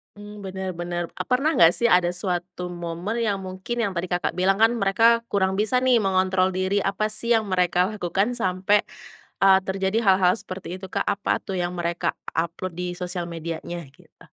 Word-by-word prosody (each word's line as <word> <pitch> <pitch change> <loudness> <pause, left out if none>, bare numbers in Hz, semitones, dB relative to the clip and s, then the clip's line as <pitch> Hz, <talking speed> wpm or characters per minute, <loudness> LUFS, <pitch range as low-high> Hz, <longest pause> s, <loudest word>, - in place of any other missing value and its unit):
Mmm, 205 0 -10
benar, 190 -1 -5
benar. 175 0 -3
Eee, - - -6
pernah 275 +5 +2
enggak 165 0 +7
sih 235 - +1
ada 180 -3 +4
suatu 180 0 -3
momen 175 +4 -4
yang 215 -4 0
mungkin, 190 +5 -5
yang 200 -5 -1
tadi 175 +1 -3
Kakak 175 0 -1
bilang 190 +2 +2
kan 225 +2 +4
mereka 230 +3 +3
kurang 190 -1 +1
bisa 215 +5 +2
nih 250 -4 +3
mengontrol 190 0 +2
diri, 185 +2 0
apa 215 +2 0
sih 215 +2 -3
yang 220 -2 +3
mereka 180 -1 +2
lakukan 205 +3 -1
sampai, 190 -1 +1 0.6
eee, 195 -1 +7
terjadi 190 +2 0
hal-hal 190 +1 +4
seperti 185 0 -7
itu, 190 - -8
Kak? 185 - -2
Apa 200 - -1
tuh 190 -1 -4
yang 175 0 -2
mereka 170 0 -1 0.2
upload 170 +3 -2
di 180 0 -3
sosial 180 -1 -4
medianya 170 +1 -5
gitu? - - -22
190 Hz, 185 wpm, -24 LUFS, 180-205 Hz, 0.6 s, enggak